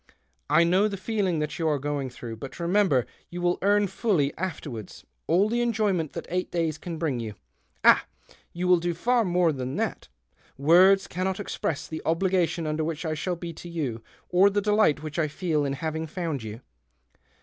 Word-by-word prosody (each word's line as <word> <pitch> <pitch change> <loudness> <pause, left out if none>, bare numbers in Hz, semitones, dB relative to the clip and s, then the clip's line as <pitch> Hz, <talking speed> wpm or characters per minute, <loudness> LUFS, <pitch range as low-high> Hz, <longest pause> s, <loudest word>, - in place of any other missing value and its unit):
I 170 - +5
know 185 +5 +3
the 200 -2 -4
feeling 190 -3 -1
that 150 +1 -3
you 165 - +1
are 150 -2 +2
going 140 -1 -2
through. 120 -2 -8
But 135 +8 -9
remember 170 - +2 0.2
you 175 - -6
will 175 0 +1
earn 205 +1 +3
fully, 190 -7 0
afterwards, 145 - -6 0.2
all 180 +6 +4
the 240 +2 0
enjoyment 210 -9 0
that - - -5
eight 180 +1 -2
days 165 -3 -1
can 170 -2 -6
bring 150 -7 -1
you. 110 -3 -5 0.5
Ah! - - +6 0.4
you 180 +1 -3
will 180 -1 +5
do 170 0 -2
iiiT 235 +4 +2
more 175 -2 +3
than 130 -2 -4
that. - - -2 0.5
Words 180 +7 +6
cannot 185 +2 -2
express 165 -6 -3
the 160 - -6
obligation 170 0 +1
under 155 +1 -1
which 160 +1 -3
I 160 - -1
shall 175 +3 -2
be 170 0 -6
to 175 +2 -10
you, 140 -9 -3 0.3
or 185 +3 +5
the 205 +1 +1
delight 205 -8 +2
which 155 +1 -4
I 155 - +2
feel 155 -1 -1
in 140 - -1
having 160 +2 -3
found 160 -4 -3
you." 110 +2 -7
170 Hz, 190 wpm, -26 LUFS, 150-185 Hz, 0.5 s, Ah